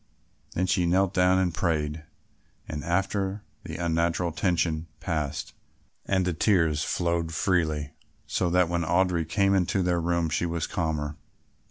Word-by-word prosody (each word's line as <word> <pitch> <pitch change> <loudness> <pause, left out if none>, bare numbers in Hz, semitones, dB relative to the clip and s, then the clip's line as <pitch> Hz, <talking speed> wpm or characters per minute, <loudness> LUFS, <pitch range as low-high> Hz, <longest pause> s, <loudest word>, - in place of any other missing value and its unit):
She 95 0 +1
then - - +1
knelt 95 +1 +2
down 90 0 +4
and 90 -2 +1
prayed, 75 -3 -1 0.6
and 75 -3 -5
after 95 +3 -1 0.2
that - - -12
the 80 - -5
unnatural 85 +1 0
tension 85 -2 0
passed 75 -5 -3 0.5
and 95 -2 +2
the 90 - 0
tears 80 -5 +2
flowed 85 -2 -1
freely, 80 -6 0 0.3
so 90 - 0
that 90 0 +3
when 85 0 -1
Audry 85 -1 +1
came 100 +1 +3
up 95 -3 +2
to 95 - +1
their 90 -1 +1
room 85 -1 0
she 85 +2 0
was 85 -1 -2
calmer. 75 -3 -2
85 Hz, 155 wpm, -27 LUFS, 80-90 Hz, 0.6 s, down